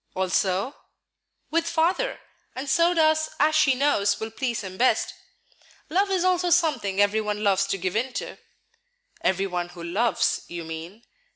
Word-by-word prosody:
"Also?" 190 Hz, +5 st, 0 dB, 0.8 s
"With 335 Hz, +1 st, +1 dB
Father; 340 Hz, +9 st, 0 dB, 0.3 s
and 265 Hz, +2 st, -5 dB
so 335 Hz, +5 st, +3 dB
does 315 Hz, -1 st, +3 dB
as 305 Hz, +2 st, +4 dB
she 300 Hz, -4 st, +4 dB
knows 260 Hz, -7 st, +2 dB
will 220 Hz, 0 st, -5 dB
please 235 Hz, 0 st, -2 dB
him 190 Hz, -2 st, -7 dB
best. 250 Hz, +5 st, +2 dB, 0.8 s
Love 390 Hz, +4 st, +2 dB
is 375 Hz, -2 st, +1 dB
also 365 Hz, -1 st, +2 dB
something 305 Hz, -, +1 dB
every 205 Hz, +2 st, +3 dB
one 210 Hz, 0 st, -3 dB
loves 195 Hz, -1 st, +2 dB
to -, -, -1 dB
give 185 Hz, 0 st, -3 dB
in 250 Hz, +4 st, 0 dB
to." -, -, -5 dB, 0.8 s
"Every 190 Hz, +1 st, +1 dB
one 175 Hz, -2 st, -3 dB
who 175 Hz, -1 st, -10 dB
loves, 195 Hz, +4 st, +1 dB
you 170 Hz, -1 st, -6 dB
mean." 165 Hz, +7 st, -8 dB
225 Hz, 160 wpm, -25 LUFS, 190-315 Hz, 0.8 s, as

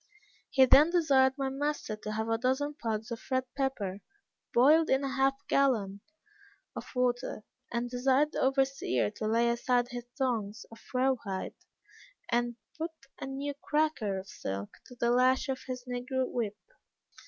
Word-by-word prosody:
He 265 Hz, -1 st, +6 dB
then 290 Hz, +5 st, +7 dB
desired 275 Hz, -7 st, +4 dB
my 270 Hz, -1 st, -1 dB
master 285 Hz, -4 st, -2 dB
to 215 Hz, 0 st, -6 dB
have 220 Hz, +1 st, -2 dB
a 225 Hz, 0 st, 0 dB
dozen 265 Hz, +4 st, 0 dB
pods 220 Hz, 0 st, -2 dB
of 230 Hz, -, -4 dB
red 260 Hz, -1 st, +1 dB
pepper 225 Hz, -9 st, -2 dB, 0.5 s
boiled 305 Hz, +7 st, +5 dB
in 265 Hz, +1 st, +3 dB
half 270 Hz, 0 st, +2 dB
a 280 Hz, -, -35 dB
gallon 215 Hz, -8 st, +1 dB, 0.7 s
of -, -, -6 dB
water, 245 Hz, -3 st, 0 dB, 0.3 s
and 235 Hz, 0 st, -1 dB
desired 260 Hz, +4 st, +2 dB
the -, -, -2 dB
overseer 265 Hz, -, +1 dB
to 215 Hz, -, -4 dB
lay 230 Hz, +2 st, +3 dB
aside 245 Hz, +1 st, +1 dB
his 245 Hz, 0 st, -6 dB
thongs 225 Hz, -6 st, -1 dB
of 225 Hz, -, -13 dB
raw 260 Hz, +1 st, +4 dB
hide, 190 Hz, -3 st, -4 dB, 0.8 s
and 240 Hz, 0 st, +1 dB, 0.2 s
put 325 Hz, +1 st, -1 dB, 0.3 s
a -, -, -5 dB
new 275 Hz, +2 st, -3 dB
cracker 300 Hz, -10 st, 0 dB
of 190 Hz, +1 st, -7 dB
silk, 100 Hz, -, -5 dB
to 250 Hz, -, -12 dB
the 235 Hz, 0 st, +1 dB
lash 255 Hz, +3 st, +3 dB
of 265 Hz, -, -2 dB
his 255 Hz, -1 st, -5 dB
negro 255 Hz, +1 st, -2 dB
whip. 215 Hz, -4 st, -3 dB
250 Hz, 160 wpm, -30 LUFS, 225-270 Hz, 0.8 s, then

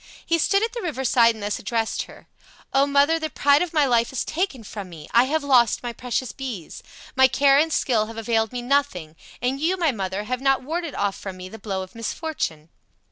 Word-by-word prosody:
He 335 Hz, 0 st, +1 dB
stood 395 Hz, +6 st, +2 dB
at 455 Hz, -, -1 dB
the 475 Hz, -, -4 dB
river 285 Hz, -, -3 dB
side 230 Hz, -2 st, +4 dB
and 215 Hz, -, -9 dB
thus 205 Hz, 0 st, -2 dB
addressed 225 Hz, +1 st, -2 dB
her: -, -, -14 dB, 0.5 s
"O 275 Hz, +1 st, +4 dB
mother, 285 Hz, +3 st, +3 dB
the 315 Hz, -1 st, -3 dB
pride 285 Hz, +2 st, +3 dB
of 355 Hz, -2 st, -1 dB
my 300 Hz, -3 st, +3 dB
life 235 Hz, -2 st, +2 dB
is 265 Hz, -, -2 dB
taken 315 Hz, -, -2 dB
from 200 Hz, -2 st, -8 dB
me! 155 Hz, -3 st, -11 dB
I 235 Hz, +2 st, +6 dB
have 310 Hz, +3 st, -1 dB
lost 250 Hz, -5 st, +3 dB
my 240 Hz, -1 st, -4 dB
precious 250 Hz, +1 st, -3 dB
bees. 240 Hz, -, -7 dB, 0.3 s
My 265 Hz, 0 st, +6 dB
care 275 Hz, +1 st, +4 dB
and 320 Hz, +2 st, +2 dB
skill 225 Hz, -7 st, +1 dB
have 225 Hz, 0 st, -9 dB
availed 225 Hz, -1 st, 0 dB
me 245 Hz, -1 st, -5 dB
nothing, 240 Hz, -, 0 dB, 0.3 s
and 260 Hz, +2 st, 0 dB
you 355 Hz, +4 st, +1 dB
my 335 Hz, -5 st, +2 dB
mother 195 Hz, -3 st, -3 dB
have 250 Hz, +4 st, -3 dB
not 270 Hz, -1 st, +2 dB
warded 325 Hz, +2 st, -4 dB
off 200 Hz, -1 st, 0 dB
from 190 Hz, -2 st, -8 dB
me 185 Hz, 0 st, -8 dB
the 220 Hz, -, -10 dB
blow 195 Hz, -2 st, -3 dB
of 185 Hz, -, -13 dB
misfortune." 230 Hz, -, -4 dB
250 Hz, 225 wpm, -23 LUFS, 220-285 Hz, 0.5 s, I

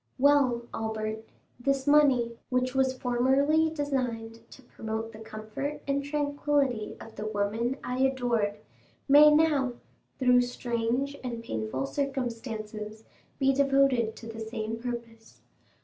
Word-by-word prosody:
Well, 265 Hz, -3 st, +4 dB
Albert, 220 Hz, 0 st, -3 dB, 0.3 s
this 275 Hz, +1 st, 0 dB
money, 270 Hz, -6 st, +4 dB
which 255 Hz, 0 st, 0 dB
was 260 Hz, -1 st, +1 dB
formerly 270 Hz, +6 st, +2 dB
designed 250 Hz, -7 st, -3 dB
to 265 Hz, -, -14 dB
promote 220 Hz, -1 st, -5 dB
the 215 Hz, -, -12 dB
comfort 220 Hz, +6 st, -6 dB
and 280 Hz, 0 st, 0 dB
tranquillity 285 Hz, -5 st, 0 dB
of 225 Hz, -, -11 dB
the 215 Hz, -, -4 dB
woman 215 Hz, +5 st, -1 dB
I 250 Hz, +1 st, -3 dB
adored, 245 Hz, -6 st, +1 dB, 0.5 s
may 295 Hz, +2 st, +9 dB
now, 300 Hz, -4 st, +3 dB, 0.4 s
through 250 Hz, -1 st, +5 dB
strange 245 Hz, +2 st, -1 dB
and 235 Hz, -2 st, -4 dB
painful 110 Hz, -, -3 dB
circumstances, 225 Hz, -, -4 dB, 0.3 s
be 270 Hz, -1 st, +3 dB
devoted 270 Hz, -4 st, +3 dB
to 225 Hz, -, -11 dB
the 225 Hz, 0 st, -7 dB
same 220 Hz, 0 st, -4 dB
purpose. 230 Hz, -1 st, -7 dB
245 Hz, 120 wpm, -28 LUFS, 225-275 Hz, 0.5 s, may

